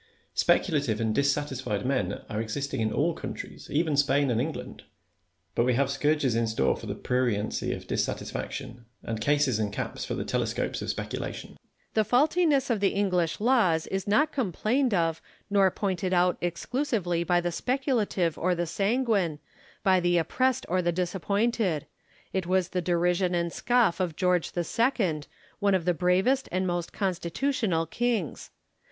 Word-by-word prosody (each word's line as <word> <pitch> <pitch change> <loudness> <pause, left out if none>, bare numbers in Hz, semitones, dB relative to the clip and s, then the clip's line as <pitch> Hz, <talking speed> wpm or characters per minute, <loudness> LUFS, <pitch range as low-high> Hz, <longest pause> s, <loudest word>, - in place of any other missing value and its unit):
Speculative 140 - +2
and 110 -1 0
dissatisfied 135 -6 0
men 125 -8 -1
are 110 0 -2
existing 115 +3 -3
in 110 -1 0
all 165 +8 +1
countries, - - -7
even 155 +1 +1
in - - 0
Spain 140 -1 +3
and 115 0 +1
England; 155 +4 -5 0.7
but - - +2
we 125 0 +2
have 135 +1 +1
scourges 140 -1 +1
in 115 0 +1
store 110 -12 +1
for - - -9
the - - -3
pruriency 120 -5 -1
of - - -10
dissatisfaction, 120 -4 -4 0.2
and 110 -1 -4
cases 140 -2 +2
and 105 -2 -1
caps - - -4
for - - -3
the - - -3
telescopes - - -1
of - - -4
speculation. - - -4
Lacy. - - -19 0.3
The 220 - +3
faultiness 285 - +3
of 225 - +1
the 195 -1 +1
English 180 -5 +1
laws 210 -9 +3
is 190 0 -3
not 300 +10 +3
com 245 -10 -1
plained 245 - +1
of 165 -2 0 0.3
nor 195 -2 +5
pointed 185 -1 -2
out 180 0 +3
exclusively 175 - -1
by 175 0 +2
the 175 0 -1
speculative 230 - 0
or 180 +1 +1
the 175 0 -1
sanguine, 200 - +1 0.5
by 190 -2 +4
the 175 0 +2
oppressed 255 +10 +1
or 185 +1 +1
the 175 0 +1
disappointed; 190 - 0 0.5
it 190 -3 -1
was 185 -1 +1
the 180 - -1
derision 175 +1 +1
and 170 -1 0
scofi" 240 -8 +2
of 170 -4 -3
George 180 -2 +1
the 175 - 0
Second, 195 - 0 0.3
one 200 -2 +3
of 175 -3 -1
the 180 - +3
bravest 190 +10 +2
and 185 +1 0
most 175 -1 -2
constitutional 190 - -1
kings. 225 - -2
175 Hz, 165 wpm, -27 LUFS, 145-200 Hz, 0.7 s, nor